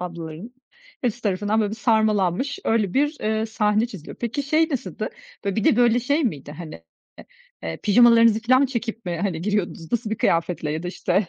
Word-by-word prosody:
ablaların 170 Hz, +4 st, -7 dB, 0.5 s
hepsi 245 Hz, -1 st, -2 dB
tarafından 205 Hz, +2 st, 0 dB
böyle 210 Hz, -2 st, 0 dB
bir 220 Hz, -, -5 dB
sarmalanmış, 220 Hz, +1 st, +1 dB
öyle 215 Hz, -5 st, +1 dB
bir, 295 Hz, +3 st, +1 dB
eee, 220 Hz, +1 st, 0 dB
sahne 215 Hz, 0 st, +1 dB
çiziliyor. 190 Hz, -9 st, -10 dB
Peki, 240 Hz, +4 st, -2 dB
şey 310 Hz, +4 st, +2 dB
nasıldı,? 270 Hz, -6 st, -4 dB, 0.4 s
Böyle, 200 Hz, -1 st, -1 dB
bir 220 Hz, -, 0 dB
de -, -, +4 dB
böyle 240 Hz, 0 st, +4 dB
şey 285 Hz, +6 st, +1 dB
miydi? 145 Hz, -, -3 dB
Hani, 160 Hz, 0 st, -8 dB, 0.4 s
e -, -, -11 dB, 0.4 s
eee, 80 Hz, 0 st, -4 dB
pijamalarınızı 230 Hz, 0 st, +5 dB
filan 255 Hz, +3 st, +4 dB
mı 280 Hz, -, +4 dB
çekip 235 Hz, -3 st, -4 dB
mi, 175 Hz, -2 st, -3 dB
hani, 185 Hz, -6 st, -1 dB
giriyordunuz, 185 Hz, -5 st, -2 dB
nasıl 230 Hz, -2 st, -1 dB
bir 220 Hz, -, -1 dB
kıyafetle 165 Hz, -2 st, 0 dB
ya 160 Hz, +2 st, -3 dB
da 180 Hz, -, -4 dB
işte 195 Hz, +2 st, 0 dB
215 Hz, 190 wpm, -23 LUFS, 180-240 Hz, 0.5 s, pijamalarınızı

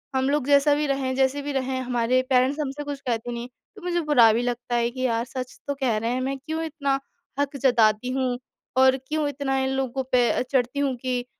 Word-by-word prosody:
हम 265 Hz, +1 st, +2 dB
लोग 290 Hz, -2 st, 0 dB
जैसा 285 Hz, +1 st, +5 dB
भी 300 Hz, 0 st, 0 dB
रहें 270 Hz, -1 st, -1 dB
जैसे 270 Hz, +2 st, +1 dB
भी 290 Hz, +1 st, -4 dB
रहें, 260 Hz, -1 st, -1 dB
हमारे 250 Hz, 0 st, +1 dB
पेरेंट्स 260 Hz, +3 st, +3 dB
हमसे 290 Hz, 0 st, -3 dB
कुछ 285 Hz, -1 st, -5 dB
कहते 235 Hz, 0 st, -1 dB
नहीं।" 235 Hz, +1 st, -5 dB, 0.3 s
तो 405 Hz, -, -12 dB
मुझे 345 Hz, -1 st, -1 dB
बुरा 230 Hz, -5 st, +7 dB
भी 235 Hz, -, +1 dB
लगता 245 Hz, 0 st, -2 dB
है 235 Hz, 0 st, +2 dB
कि 255 Hz, +1 st, -7 dB
यार 230 Hz, -1 st, +1 dB
सच 255 Hz, -1 st, -7 dB
तो 285 Hz, -, 0 dB
कह 250 Hz, -5 st, 0 dB
रहे 230 Hz, +2 st, -1 dB
हैं, 255 Hz, +1 st, -1 dB
मैं 270 Hz, +1 st, -2 dB
क्यों 315 Hz, +4 st, -4 dB
इतना 280 Hz, -3 st, -1 dB, 0.4 s
हक 285 Hz, 0 st, -1 dB
जताती 230 Hz, -1 st, +3 dB
हूँ 255 Hz, -2 st, 0 dB, 0.4 s
और 260 Hz, 0 st, +6 dB
क्यों 305 Hz, -1 st, 0 dB
इतना 270 Hz, -1 st, -2 dB
इन 265 Hz, -, 0 dB
लोगों 265 Hz, 0 st, -1 dB
पे 245 Hz, -1 st, +4 dB
अ, -, -, 0 dB
चढ़ती 255 Hz, +1 st, 0 dB
हूँ 275 Hz, -3 st, +1 dB
कि 250 Hz, 0 st, -2 dB
260 Hz, 225 wpm, -24 LUFS, 245-280 Hz, 0.4 s, बुरा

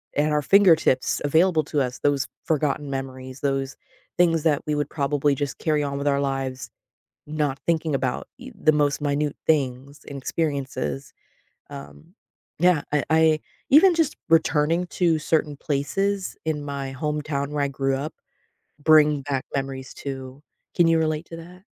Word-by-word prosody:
at 150 Hz, +1 st, +1 dB
our 150 Hz, 0 st, +2 dB
fingertips 165 Hz, -8 st, +4 dB
available 160 Hz, +2 st, +3 dB
to 150 Hz, 0 st, -1 dB
us, 125 Hz, -1 st, -3 dB
those 140 Hz, -2 st, +1 dB, 0.2 s
forgotten 150 Hz, -2 st, 0 dB
memories, 130 Hz, -1 st, -6 dB
those 135 Hz, -1 st, -1 dB, 0.4 s
things 165 Hz, -3 st, +3 dB
that 150 Hz, -3 st, +2 dB
we 150 Hz, -, 0 dB
would 145 Hz, -1 st, -2 dB
probably 145 Hz, -1 st, 0 dB
just 140 Hz, -1 st, -3 dB
carry 155 Hz, -2 st, +1 dB
on 140 Hz, -1 st, -3 dB
with 140 Hz, -, -3 dB
our 140 Hz, 0 st, +2 dB
lives, 135 Hz, -4 st, -3 dB, 0.6 s
not 150 Hz, -2 st, -2 dB
thinking 160 Hz, -2 st, 0 dB
about, 130 Hz, -1 st, -2 dB
y 255 Hz, +1 st, -10 dB
the 155 Hz, -6 st, +3 dB
most 145 Hz, -1 st, +1 dB
minute 145 Hz, 0 st, -1 dB
things 140 Hz, -2 st, 0 dB
and 140 Hz, -, -7 dB
experiences. 135 Hz, -, -3 dB, 0.6 s
Um, 70 Hz, +1 st, -11 dB, 0.4 s
yeah, 175 Hz, -2 st, +3 dB
I 150 Hz, -, +1 dB
I 160 Hz, -1 st, +4 dB, 0.3 s
even 345 Hz, +6 st, +7 dB
just 325 Hz, -3 st, 0 dB
returning 165 Hz, +1 st, +2 dB
to 170 Hz, -3 st, +1 dB
certain 155 Hz, -1 st, 0 dB
places 190 Hz, +8 st, -2 dB
in 155 Hz, -2 st, -2 dB
my 140 Hz, -2 st, -5 dB
hometown 150 Hz, -1 st, -2 dB
where 150 Hz, -1 st, -1 dB
I 140 Hz, -, -1 dB
grew 135 Hz, 0 st, -1 dB
up, 145 Hz, +3 st, -5 dB, 0.7 s
bring 150 Hz, -1 st, +5 dB
back 135 Hz, -2 st, -2 dB
memories 135 Hz, -1 st, -4 dB
too. 135 Hz, 0 st, -7 dB, 0.3 s
Can 175 Hz, -2 st, +4 dB
you 165 Hz, 0 st, +4 dB
relate 155 Hz, 0 st, -1 dB
to 165 Hz, -, -8 dB
that? 180 Hz, +3 st, -13 dB
145 Hz, 155 wpm, -24 LUFS, 135-160 Hz, 0.7 s, even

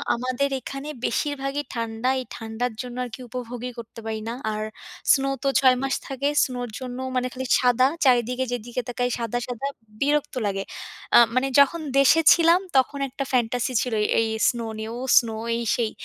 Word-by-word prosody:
আমাদের 255 Hz, +3 st, -1 dB
এখানে 275 Hz, +2 st, -6 dB, 0.2 s
বেশিরভাগই 285 Hz, -1 st, -1 dB
ঠান্ডা। 230 Hz, +2 st, -2 dB
এই 255 Hz, -, -5 dB
ঠান্ডার 225 Hz, +2 st, -3 dB
জন্য 250 Hz, -1 st, -8 dB
আরকি 245 Hz, +2 st, -9 dB
উপভোগই 250 Hz, 0 st, -5 dB
করতে 230 Hz, 0 st, -10 dB
পারি 220 Hz, -1 st, -3 dB
না। -, -, -3 dB, 0.2 s
আর 215 Hz, 0 st, -3 dB, 0.5 s
snow 275 Hz, 0 st, +1 dB
তো -, -, +1 dB
৬ 260 Hz, -1 st, +5 dB
মাস 270 Hz, -, 0 dB
থাকে। 275 Hz, +1 st, -2 dB, 0.2 s
snow-র 245 Hz, -2 st, -3 dB
জন্য 250 Hz, -1 st, -6 dB, 0.2 s
মানে 255 Hz, 0 st, +1 dB
খালি 260 Hz, 0 st, -5 dB
সাদা। 255 Hz, +1 st, +4 dB, 0.2 s
চারিদিকে 250 Hz, +1 st, +3 dB
যেদিকে 240 Hz, +1 st, -3 dB
তাকাই, 245 Hz, 0 st, -1 dB
সাদা, 235 Hz, +1 st, -2 dB
সাদা, 250 Hz, +3 st, -3 dB, 0.3 s
বিরক্ত 290 Hz, -1 st, +1 dB
লাগে। 195 Hz, 0 st, -2 dB, 0.5 s
আ -, -, +10 dB, 0.2 s
মানে 260 Hz, +1 st, +2 dB
যখন 315 Hz, +4 st, +4 dB, 0.2 s
দেশে 315 Hz, +4 st, +6 dB
ছিলাম, 335 Hz, +1 st, +4 dB, 0.2 s
তখন 280 Hz, +2 st, +2 dB
একটা 275 Hz, +2 st, -4 dB
fantasy 245 Hz, +1 st, +1 dB
ছিল 250 Hz, -3 st, -2 dB
এই, -, -, +1 dB
এই 225 Hz, -, +2 dB, 0.2 s
snow 230 Hz, -2 st, -3 dB
নিয়েও। 225 Hz, +2 st, -5 dB, 0.2 s
snow 225 Hz, -2 st, -5 dB, 0.2 s
এই 235 Hz, -, -2 dB
সেই। 230 Hz, -3 st, -1 dB
250 Hz, 170 wpm, -24 LUFS, 235-270 Hz, 0.5 s, আ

